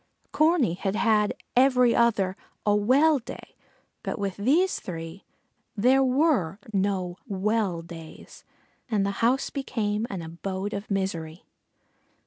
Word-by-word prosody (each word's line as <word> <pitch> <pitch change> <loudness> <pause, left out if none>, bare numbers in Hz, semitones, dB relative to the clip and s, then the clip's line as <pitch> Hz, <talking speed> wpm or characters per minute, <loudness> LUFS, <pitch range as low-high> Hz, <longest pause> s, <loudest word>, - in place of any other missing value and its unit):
Corney 310 - +3
had 195 +2 -2
had 215 -2 +2 0.2
every 250 -2 +5
other 205 -5 +2 0.3
a 205 -1 +4
"well 275 +8 +4
day," 230 - -11 0.5
but - - -4
with 200 -3 -3
these 305 - +2
three 165 +1 -8 0.5
there 255 +5 +4
were 260 - +2 0.2
no 190 -2 -1
"well 200 -3 -1
days" 165 -1 -12 0.5
and 205 -4 +1
the 200 - 0
house 250 +4 +2
became 220 -5 -2
an 185 -4 -5
abode 190 +5 -5
of 200 +1 -5
misery. 175 -4 -3
205 Hz, 120 wpm, -26 LUFS, 190-250 Hz, 0.5 s, every